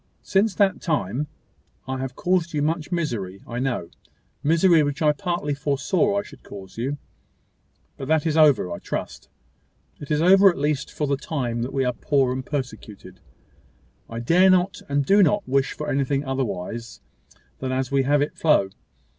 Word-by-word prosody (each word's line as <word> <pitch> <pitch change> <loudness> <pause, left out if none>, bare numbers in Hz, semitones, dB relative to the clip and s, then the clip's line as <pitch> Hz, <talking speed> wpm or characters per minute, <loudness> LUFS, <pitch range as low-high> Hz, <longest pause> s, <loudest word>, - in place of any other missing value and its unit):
Since 200 +1 +1
that 200 -2 +2
time 150 - -1 0.6
I 130 0 -3
have 130 -1 -5
caused 175 -3 0
you 145 - +1
much 160 +2 -2
misery, 115 - -3
I 120 +1 -5
know 125 -10 -2 0.5
misery 165 +3 +4
which 145 -1 -1
I 150 - +5
partly 170 -2 -2
foresaw 150 +8 0
I 200 - 0
should 140 -9 -14
cause 95 -2 -11
you: 135 +5 -3 1.0
but 135 - -6
that 160 0 +2
is 155 -2 0
over, 145 - +4
I 85 - -5
trust. - - -6 0.7
It 145 - -9
is 150 - +1
over 190 +4 +7
at 175 - -2
least 145 -1 -1
for 150 - -2
the 140 -1 0
time 125 -6 -3
that 125 +3 -3
we 135 -1 0
are 125 - 0
poor 135 0 +1
and 130 0 -4
persecuted. 125 -7 -6 0.9
I 115 - -5
dare 180 +10 +4
not 185 0 +2
and 140 0 +1
do 200 +5 +5
not 205 +2 +2
wish 135 +1 +1
for 150 - -6
anything 140 +1 0
otherwise 120 -3 -4 0.6
than 130 -1 -3
as 130 0 -2
we 140 -1 +3
have 145 +2 +2
it 145 - -5
flow. 150 -12 +2
145 Hz, 175 wpm, -23 LUFS, 130-165 Hz, 1.0 s, over